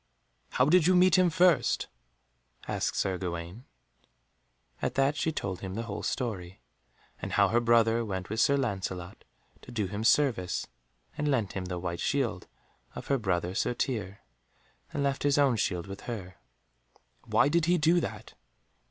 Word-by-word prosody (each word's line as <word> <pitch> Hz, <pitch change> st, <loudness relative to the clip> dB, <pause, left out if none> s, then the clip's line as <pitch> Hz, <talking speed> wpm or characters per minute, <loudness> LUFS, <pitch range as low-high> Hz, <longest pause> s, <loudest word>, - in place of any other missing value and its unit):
"How 125 Hz, -, +3 dB
did 165 Hz, +2 st, +4 dB
you 185 Hz, -, +5 dB
meet 180 Hz, -1 st, +5 dB
him 185 Hz, -1 st, +4 dB
first?" 175 Hz, -1 st, +3 dB, 0.8 s
asked -, -, -1 dB
Sir 95 Hz, -2 st, 0 dB
Gawaine. 85 Hz, +6 st, -5 dB, 1.2 s
At -, -, -2 dB
that 135 Hz, +2 st, +2 dB
she 160 Hz, -, 0 dB
told 95 Hz, -, -4 dB
him 95 Hz, -1 st, -5 dB
the 115 Hz, -, -3 dB
whole 105 Hz, -3 st, -5 dB
story, 95 Hz, -8 st, -4 dB, 0.6 s
and -, -, -5 dB
how 100 Hz, -1 st, +4 dB
her 115 Hz, +4 st, +3 dB
brother 115 Hz, -1 st, +3 dB
went 95 Hz, -4 st, -4 dB
with 110 Hz, +2 st, -3 dB
Sir 140 Hz, +4 st, +4 dB
Lancelot 95 Hz, -7 st, -4 dB, 0.4 s
to -, -, -12 dB
do 110 Hz, -4 st, -1 dB
him 100 Hz, +3 st, -4 dB
service, 115 Hz, -8 st, +2 dB, 0.5 s
and 150 Hz, 0 st, 0 dB
lent 115 Hz, -9 st, 0 dB
him 95 Hz, -1 st, -4 dB
the 90 Hz, -1 st, -4 dB
white 85 Hz, -1 st, -4 dB
shield 120 Hz, -5 st, -1 dB, 0.5 s
of -, -, -8 dB
her 140 Hz, -1 st, +2 dB
brother 90 Hz, -4 st, -1 dB
Sir 110 Hz, +4 st, 0 dB
Tirre 100 Hz, -7 st, -3 dB, 0.7 s
and 145 Hz, -, -2 dB
left 140 Hz, -1 st, 0 dB
his 145 Hz, 0 st, +2 dB
own 140 Hz, -4 st, +4 dB
shield 90 Hz, -5 st, -1 dB
with 100 Hz, 0 st, -8 dB
her. 95 Hz, -7 st, -6 dB, 0.9 s
"Why -, -, +4 dB
did 165 Hz, +2 st, +2 dB
he 175 Hz, +1 st, +3 dB
do 165 Hz, +2 st, +4 dB
that?" -, -, -6 dB
115 Hz, 165 wpm, -29 LUFS, 95-140 Hz, 1.2 s, you